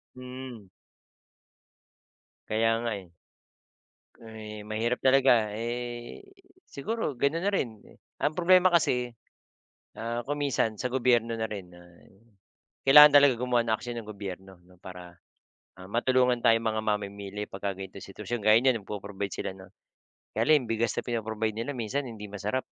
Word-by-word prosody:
Hmm. 125 -5 -9 1.8
Kaya 115 +1 +1
nga, 120 - -2
eh. 95 -3 -12 1.1
Eh, 110 -2 -9
mahirap 110 +3 -1
talaga. 130 -5 +4
Eh, 120 - -5 0.4
siguro, 185 +2 -3
ganun 140 +7 0
na 205 - +2
rin. 130 -10 0 0.5
Ang 150 +2 0
problema 180 +1 +4
kasi, 125 -7 +1 0.8
ah, 115 +1 -3
kung 145 0 -2
minsan, 115 -5 0
sa 125 +3 -3
gobyerno 120 -3 +2
na 110 - -1
rin 95 -4 -8
na 90 - -15 1.1
kailangan 150 +2 +10
talaga 140 -2 +6
gumawa 125 0 +1
ng 110 - +2
aksiyon 120 +1 -7
ang 105 - -15
gobyerno 95 -2 -8
'no, 90 0 -21
para, 90 -1 -11 0.6
ah, 95 - -10
matulungan 125 +2 +2
tayong 115 0 +4
mga 110 0 -1
mamimili 100 -1 -3
pagka 100 +1 -4
gan'tong 95 0 -9
sitwasyon. 105 +3 -6
Gaya 110 +1 +6
niyan, 125 -5 +1
nag-po-provide 100 -1 -5
sila - - -4
ng 95 0 -14 0.6
kaya - - +1
lang 155 - +7
'yong 115 - -5
bigas 115 +1 0
na - - -1
pino-provide 110 -2 -2
nila 115 +5 -3
minsan, 130 +4 -2
hindi 105 -3 -8
masarap. 105 +5 -2
115 Hz, 145 wpm, -28 LUFS, 105-125 Hz, 1.8 s, kailangan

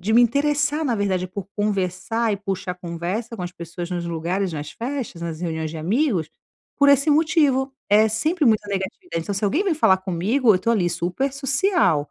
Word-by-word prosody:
de 210 +5 -1
me 235 - +7
interessar, 290 +5 +2
na 245 - +1
verdade, 185 -3 -1
por 190 0 -6
conversar 210 +3 -1
e - - -1
puxar 190 -2 -4
conversa 180 +6 -4
com 185 - -5
as 175 0 -5
pessoas 170 +1 -7
nos 175 -1 -3
lugares, 170 +3 -2
nas 150 -1 -5
festas, 240 -8 -5
nas 165 -1 -5
reuniões 160 -2 -3
de 165 - -7
amigos, 190 - 0 0.5
por 285 - +4
esse 280 +2 +5
motivo. 290 -4 +2 0.2
É 215 +2 +5
sempre 305 +10 0
muita 215 -4 +3
negativa, 200 - -4
então 165 +5 -2
se 200 - -2
alguém 295 - +2
vem 380 -5 +1
falar 190 -11 +4
comigo, 200 +7 +2
eu - - +2
tô 210 +5 0
ali, 195 -7 +2
super 180 +11 -2
social, 275 - +1
205 Hz, 195 wpm, -22 LUFS, 180-270 Hz, 0.5 s, me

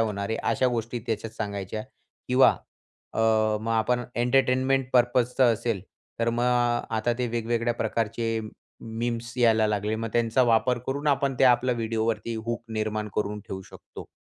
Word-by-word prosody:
होणार 100 -2 -1
आहे. 110 - 0 0.2
अशा 130 - +2
गोष्टी 120 0 -2
त्याच्यात 110 -1 -3
सांगायच्या 100 0 -4 0.5
किंवा 130 +1 +6 0.6
अ, - - -3 0.4
मग 115 +1 -3
आपण 120 +2 +1
एंटरटेनमेंट 130 +1 +2
पर्पज 120 0 +3
चं 125 -3 +6
असेल 115 -4 -2 0.4
तर 115 0 +2
मग 120 +1 0 0.5
आता 115 +2 +1
ते 125 - 0
वेगवेगळ्या 115 0 -1
प्रकारचे 115 0 -1 0.4
मीम्स 115 +1 -4
यायला 110 -2 +4
लागले 105 +1 -1
मग 115 +1 -3
त्यांचा 120 +1 +2
वापर 120 +1 +2
करून 140 +3 -3
आपण 140 -1 +1
ते - - +5
आपल्या 125 0 +4
व्हिडिओवरती 115 0 -1
हूक 120 0 -2
निर्माण 110 -1 -2
करून 105 0 -1
ठेवू 95 0 -6
शकतो. - - -12
115 Hz, 150 wpm, -26 LUFS, 110-120 Hz, 0.6 s, किंवा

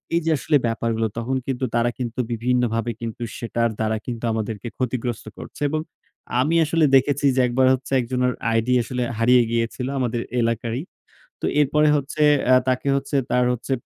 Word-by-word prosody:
এই - - +4
যে, 165 - +2
আসলে 145 +3 +2
ব্যাপারগুলো, 115 0 -1
তখন 120 +3 -2
কিন্তু 130 -1 -1
তারা 120 0 +2
কিন্তু 120 -1 -4
বিভিন্নভাবে 120 -1 0
কিন্তু 115 +1 -5
সেটার 115 0 -1
দ্বারা 110 0 0
কিন্তু 120 -2 -5
আমাদেরকে 110 0 -4
ক্ষতিগ্রস্ত 125 -2 -3
করছে। - - -11
এবং 155 +1 -1 0.6
আমি 155 +5 +1
আসলে 160 +1 +2
দেখেছি 140 +2 +2
যে, - - +1
একবার 130 +2 +2
হচ্ছে 130 0 -4
একজনের 125 +1 0 0.2
ID 115 +1 0 0.2
আসলে 125 +1 -3
হারিয়ে 120 +2 +5
গিয়েছিল 115 +2 -1
আমাদের 120 -2 -1 0.2
এলাকারই। 115 +2 -1 0.6
তো - - -2
এরপরে 150 +1 +3
হচ্ছে 145 +2 -3 0.3
আ - - +8
তাকে 130 +2 0
হচ্ছে 140 +1 -2
তার 125 - +3
হচ্ছে 125 +2 -4
125 Hz, 165 wpm, -22 LUFS, 115-130 Hz, 0.6 s, আ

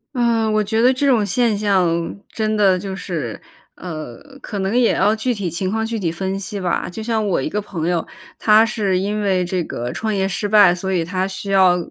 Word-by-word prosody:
啊， 230 -2 +2
我 215 0 +2
觉 220 +2 0
得 250 +2 +5
这 260 +2 -1
种 245 -6 +4
现 230 +2 +1
象 180 -5 0
真 215 -1 -1
的 190 -3 +4
就 190 0 -5
是 165 - -5 0.4
呃 155 -8 -7 0.2
可 205 - -6
能 195 +4 -1
也 245 -2 +4
要 210 +3 +3
具 235 +2 -1
体 190 -4 -3
情 185 +3 -2
况 220 +2 -1
具 225 -1 -3
体 170 -4 -1
分 190 +3 -3
析 200 +1 -5
吧。 180 -2 -1
就 200 +5 -7
像 220 -1 0
我 190 - +1
一 - - -2
个 210 +6 -2
朋 170 -5 -4
友， 175 -2 0 0.3
他 215 +1 +5
是 200 -5 0
因 205 +3 -1
为 185 -3 +1
这 180 0 -1
个 120 -5 -5
创 220 -1 -2
业 190 -1 +1
失 200 +2 -3
败， 205 -4 +6
所 190 +2 -4
以 175 -3 0
他 185 +2 -1
需 195 +1 -6
要 185 -2 +5
195 Hz, 240 characters per minute, -20 LUFS, 180-215 Hz, 0.4 s, 败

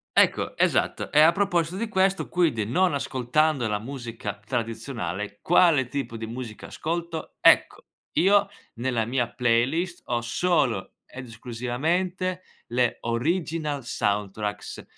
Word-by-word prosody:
Ecco, - - +3
esatto, - - +1
e 150 - +4
a 160 +2 +8
proposito 175 -3 0
di 230 +4 -2
questo, 190 -1 +1
quindi 155 - +1
non 175 - +2
ascoltando 135 0 +1
la 105 - 0
musica 115 -4 -6
tradizionale, 110 -4 -4
quale 165 -7 +4
tipo 135 -5 -4
di 110 - -5
musica, 115 -1 -7
ascolto, 165 0 -4
ecco, - - +4 0.3
io 200 +2 +4 0.3
nella 120 -2 -1
mia 120 0 0
playlist 135 +9 +1
ho 120 -1 -1
solo 120 - 0
ed 130 0 -9
esclusivamente 160 - -2 0.3
le 120 0 +1
Original 150 +3 -1
Soundtracks, 105 -1 -2
130 Hz, 120 wpm, -25 LUFS, 115-170 Hz, 0.3 s, a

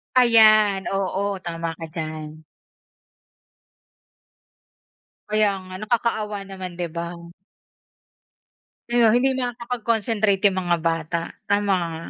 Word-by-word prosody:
Ayan, 215 -5 +5
oo. 195 +1 -1
Tama 165 -1 -4
ka 165 0 -7
diyan. 155 -1 -6 2.9
Kaya 215 -1 +3 0.2
nga. 185 - -11
Nakakaawa 215 -2 -1
naman, 190 -2 -7
'di 175 - -2
ba? 170 0 -4 1.8
Kaya 240 -2 +4
hindi 255 +4 +3
makakapag-concentrate 230 -4 -1
yung 190 -2 +3
mga 175 -1 +1
bata, 165 0 -1 0.3
tama 205 -1 +2
nga. 165 -1 -4
200 Hz, 95 wpm, -23 LUFS, 170-225 Hz, 2.9 s, Ayan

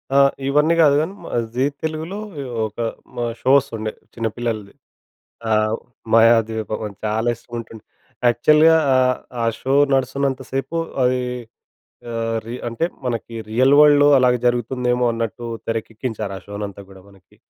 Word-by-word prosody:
ఆ! - - +6 0.3
ఇవన్నీ 150 +4 +3
కాదు 145 -2 +5
కానీ, 165 +5 -3 0.4
జీ 125 - 0 0.2
తెలుగులో 160 +5 -3 0.2
ఒ - - -4 0.2
ఒక - - -17 0.4
హ్మ్. - - -5 0.2
షో 130 - +2
వస్తుండే 110 -5 -3 0.2
చిన్నపిల్లలది. 115 -2 -3 0.8
ఆహ్, 110 0 +2 0.4
మాయాద్వీపమని 110 -2 +2
చాలా 110 +2 0
ఇష్టముంటుండే. 115 -2 -9 0.4
యాక్చువల్‌గా 150 +7 +5 0.2
ఆహ్, 130 -1 +3 0.2
ఆ - - +1 0.2
షో 135 +1 0 0.2
నడుస్తున్నంత 135 0 0
సేపు 135 +5 -2 0.3
అది 125 0 +2 0.9
ఆహ్, 115 0 -1
రీ 115 +2 -5
అంటే 120 +8 -1 0.2
మనకి 115 -1 -3
రియల్ 130 +5 +4
వరల్డ్‌లో 145 -1 +7
అలాగే 125 -1 +3
జరుగుతుందేమో 125 +1 0
అన్నట్టు 115 0 -4 0.2
తెరకెక్కించారు 110 -2 -4
ఆ - - -9
షోనంతా 100 -1 -6
కూడా 95 -1 -14
మనకి. 95 -2 -22
120 Hz, 125 wpm, -21 LUFS, 110-135 Hz, 0.9 s, వరల్డ్‌లో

